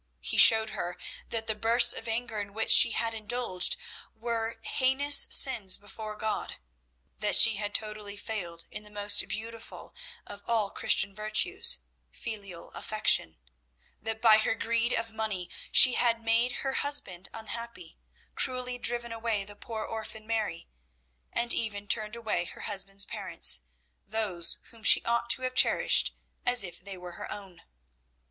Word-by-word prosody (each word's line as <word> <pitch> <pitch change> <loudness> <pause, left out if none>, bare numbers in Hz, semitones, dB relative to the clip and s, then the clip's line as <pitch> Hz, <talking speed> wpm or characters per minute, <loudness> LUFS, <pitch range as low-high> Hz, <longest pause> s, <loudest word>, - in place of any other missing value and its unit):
He - - -2
showed 220 -1 +7
her 175 +1 -6 0.3
that 225 -1 -4
the 220 - -1
bursts 230 +3 +4
of 225 - -8
anger 225 -1 -4
in 200 0 -10
which 220 - -1
she - - +9
had 230 -1 -2
indulged 220 - +1 0.4
were 230 0 -4
heinous 280 +2 +1
sins 215 -8 +3
before 215 +1 -9
God, 215 0 -4 0.6
that 210 - +3
she 220 -2 +7
had 205 0 -5
totally 210 -1 -3
failed 175 -7 -6
in - - -6
the 210 - -13
most 205 0 +3
beautiful 225 +1 -8 0.3
of 205 - -11
all 220 -4 -1
Christian 195 0 0
virtues 215 - +2 0.3
filial 200 -7 -8
affection; 150 - 0 0.6
that 220 +1 -6
by 220 -2 +6
her 225 - -1
greed 230 +2 -2
of 230 -2 -3
money 215 -5 -5 0.2
she 255 - +8
had 235 -1 +1
made 235 +2 0
her 270 -1 -3
husband 230 -12 -2
unhappy, 225 -5 -9 0.3
cruelly 250 -1 -2
driven 240 -1 +1
away 225 -3 -3
the 205 +1 -13
poor 220 0 -7
orphan 220 -1 -8
Mary, 215 -7 -4 0.6
and 235 0 0
even 205 -3 -5
turned 215 +1 -1
away 220 -6 -3
her - - -12
husband's 200 -1 -1
parents, - - -2 0.5
those 200 -6 +1
whom 230 - -13
she - - +6
ought 235 0 -1
to 255 - +3
have 255 0 -3
cherished - - +3 0.3
as 245 -3 +1
if 175 -1 -10
they 195 -1 -9
were 180 0 -10
her 170 - -9
own. 190 -4 -9
220 Hz, 155 wpm, -28 LUFS, 205-235 Hz, 0.6 s, she